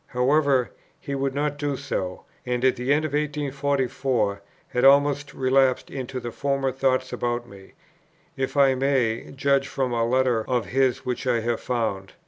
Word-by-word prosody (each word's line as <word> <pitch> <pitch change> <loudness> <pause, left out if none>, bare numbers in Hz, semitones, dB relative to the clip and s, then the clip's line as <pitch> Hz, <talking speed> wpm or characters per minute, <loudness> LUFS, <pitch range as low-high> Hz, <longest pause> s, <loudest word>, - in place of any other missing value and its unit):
However, 135 0 +2 0.3
he 140 - -6
would 135 0 -1
not 145 0 -1
do 145 -2 -1
so; 95 -10 -4 0.2
and 125 0 -1
at 130 - +4
the 125 +2 -2
end 150 +2 +3
of 155 - -3
1844 140 -7 -1 0.3
had 125 - -1
almost 140 +1 +4
relapsed 130 -1 +2
into 130 -1 -5
his 120 -2 -6
former 140 -1 0
thoughts 130 0 0
about 120 0 -2
me, 95 -2 -15 0.6
if 135 +2 -3
I 135 -1 +5
may 130 -4 0
judge 140 0 +2
from 130 -2 -2
a 115 -1 +1
letter 125 -1 +2
of 125 -4 +1
his 130 +2 0
which 125 +1 -3
I 120 -2 +2
have 120 0 -1
found. 110 -6 -2
130 Hz, 165 wpm, -24 LUFS, 120-140 Hz, 0.6 s, I